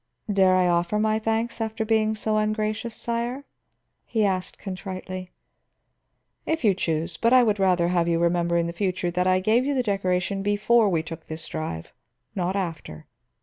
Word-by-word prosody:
"Dare 190 -1 +4
I 185 -1 +3
offer 175 +3 +1
my 215 0 +1
thanks 225 +1 -1
after 220 0 -2
being 220 -1 +2
so 215 0 0
ungracious, 215 +1 -1
sire?" 235 +3 -3 0.6
he 220 -3 0
asked 185 -2 -2
contritely. 185 -1 -6 1.1
"If 320 -2 -2
you 210 -3 +5
choose. 165 -2 -2
But 230 +2 +2
I 255 -1 +7
would 210 -3 +1
rather 180 -3 +3
have 175 -1 +1
you 170 -1 +2
remember 170 0 +1
in 170 - +1
the 170 - -4
future 180 -1 -1
that 180 +1 0
I 185 0 +4
gave 220 +6 +2
you 280 +1 -1
the 255 - +1
decoration 195 -2 -1
before 210 +2 +3
we 165 -4 0
took 165 0 -8
this 155 0 -6
drive, 155 - -5 0.4
not 185 0 -1
after." 165 - -5
195 Hz, 175 wpm, -25 LUFS, 175-220 Hz, 1.1 s, I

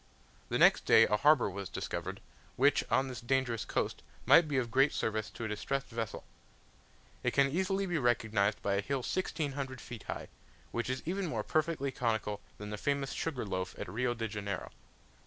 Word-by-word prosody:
The - - +1
next - - +5
day - - +7
a 105 - +2
harbour 150 +4 +5
was 100 -1 -5
discovered, - - -4 0.3
which 140 +3 +4
on 135 - +2
this 125 -2 -6
dangerous 125 -2 0
coast - - -2 0.2
might 170 -1 +7
be 145 -2 0
of 120 -3 0
great 135 +4 +4
service 110 -1 -1
to 115 - -6
a - - -1
distressed 135 +6 -2
vessel. 115 -3 -4 1.0
It - - -1
can 140 0 +4
easily 190 +4 0
be 175 -4 0
recognized 110 -4 +1
by 100 - +1
a 100 - +1
hill 135 +5 -2
1600 140 -7 -2
feet 120 -3 -9
high, - - -5 0.4
which 120 +1 -2
is 130 0 -2
even 190 +2 -1
more 115 -8 -2
perfectly 155 -2 0
conical 110 -4 -1 0.2
than 105 0 -7
the 105 - -4
famous 140 -1 0
sugar 140 -8 -2
loaf 95 -2 -3
at - - -5
Rio 120 +6 -1
de 115 -1 -2
Janeiro. 100 -2 -4
125 Hz, 185 wpm, -32 LUFS, 105-140 Hz, 1.0 s, day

